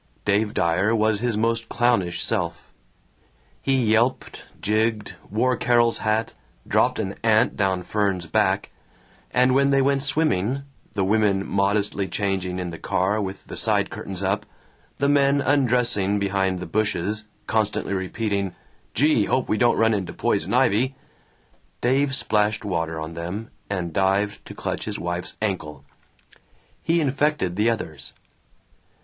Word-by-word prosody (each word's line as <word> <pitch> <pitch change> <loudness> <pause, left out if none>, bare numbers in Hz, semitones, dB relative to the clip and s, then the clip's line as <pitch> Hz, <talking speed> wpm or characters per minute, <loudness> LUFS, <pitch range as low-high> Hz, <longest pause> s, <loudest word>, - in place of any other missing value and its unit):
Dave 105 +1 +1
Dyer 90 +7 +2
was 110 -1 +2
his 120 -2 -1
most 115 +1 +1
clownish 120 -8 +1
self. - - -3 0.9
He 135 - +1
yelped, 115 +1 +1
jigged, 110 0 0 0.2
wore 125 +5 +1
Carol's 120 -1 +2
hat, 110 +1 0 0.3
dropped - - +2
an 100 -3 -2
ant 110 -1 +3
down 95 -3 0
Fern's 100 -3 -1
back, - - +1 0.6
and 125 +1 +3
when 140 +1 +4
they 140 0 +4
went 135 0 +2
swimming 140 - +1 0.3
(the 95 -2 +1
women 100 -1 +2
modestly 100 0 0
changing 95 -2 -2
in 90 -1 -4
the 85 - -8
car 100 +4 0
with 95 -1 -6
the - - -8
side - - +1
curtains 95 0 -6
up, 100 +2 -1 0.5
the 140 - +1
men 140 0 +3
undressing 125 -8 +2
behind 95 -2 0
the 90 - -5
bushes, 105 +2 -1 0.2
constantly 105 -2 0
repeating, 100 0 -2 0.4
"Gee, 145 -7 +3
hope 130 - 0
we - - +1
don't 120 -1 +3
run 115 0 +3
into 95 -4 -2
poison - - -1
ivy"), 130 +7 +2 0.8
Dave 135 +2 +2
splashed 105 -4 0
water 80 -4 -2
on 80 +1 -6
them 90 +7 -5 0.2
and 90 -4 -3
dived 100 +3 +1
to - - -9
clutch - - -4
his - - -4
wife's 85 +1 -4
ankle. 75 -9 -3 1.0
He 165 +1 +2
infected 145 - 0
the 105 +4 +2
others. 80 -10 -4
105 Hz, 140 wpm, -23 LUFS, 95-120 Hz, 1.0 s, when